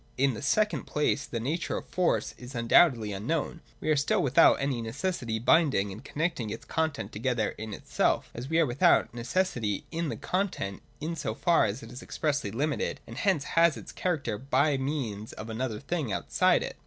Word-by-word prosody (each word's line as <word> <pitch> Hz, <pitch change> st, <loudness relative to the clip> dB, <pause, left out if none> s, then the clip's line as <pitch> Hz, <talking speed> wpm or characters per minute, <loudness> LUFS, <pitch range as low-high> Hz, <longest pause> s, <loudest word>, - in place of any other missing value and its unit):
In 135 Hz, 0 st, +3 dB
the 110 Hz, -, -6 dB
second 210 Hz, +9 st, +1 dB
place 150 Hz, -1 st, 0 dB
the 115 Hz, -, -3 dB
nature 150 Hz, +9 st, -2 dB
of -, -, -6 dB
Force 180 Hz, -2 st, 0 dB
is 125 Hz, +1 st, -10 dB
un 115 Hz, -1 st, -2 dB
doubtedly 115 Hz, -, +5 dB
unknown: 155 Hz, -, -2 dB, 0.2 s
we -, -, -6 dB
are -, -, +4 dB
still 140 Hz, +1 st, +2 dB
without 135 Hz, -2 st, +6 dB
any 135 Hz, -4 st, -1 dB
necessity 115 Hz, 0 st, -2 dB
binding 120 Hz, -, +3 dB
and 100 Hz, +4 st, -9 dB
connecting 155 Hz, -8 st, -2 dB
its 105 Hz, -, -6 dB
content 160 Hz, -3 st, -2 dB
together 115 Hz, 0 st, 0 dB
in 110 Hz, 0 st, -7 dB
itself, -, -, 0 dB
as 125 Hz, +3 st, -6 dB
we 160 Hz, -, +1 dB
are 165 Hz, -, +5 dB
without 120 Hz, -2 st, +3 dB
necessity 120 Hz, -, -1 dB
in 165 Hz, -1 st, -2 dB
the -, -, -4 dB
content, 180 Hz, -, -2 dB, 0.2 s
in 165 Hz, +2 st, -3 dB
so -, -, -3 dB
far 170 Hz, -9 st, +3 dB
as 110 Hz, +6 st, -3 dB
it -, -, -10 dB
is 125 Hz, -, -8 dB
expressly 145 Hz, -8 st, -1 dB
limited 145 Hz, +8 st, -1 dB
and -, -, -10 dB
hence 190 Hz, -8 st, +2 dB
has 165 Hz, +1 st, +3 dB
its -, -, -9 dB
character 140 Hz, -, -2 dB
by 140 Hz, +3 st, +2 dB
means 130 Hz, -7 st, -3 dB
of 110 Hz, +1 st, -7 dB
another 110 Hz, -1 st, -3 dB
thing 155 Hz, -7 st, -2 dB
outside 100 Hz, -, +2 dB
it. -, -, -6 dB
135 Hz, 190 wpm, -28 LUFS, 115-160 Hz, 0.2 s, without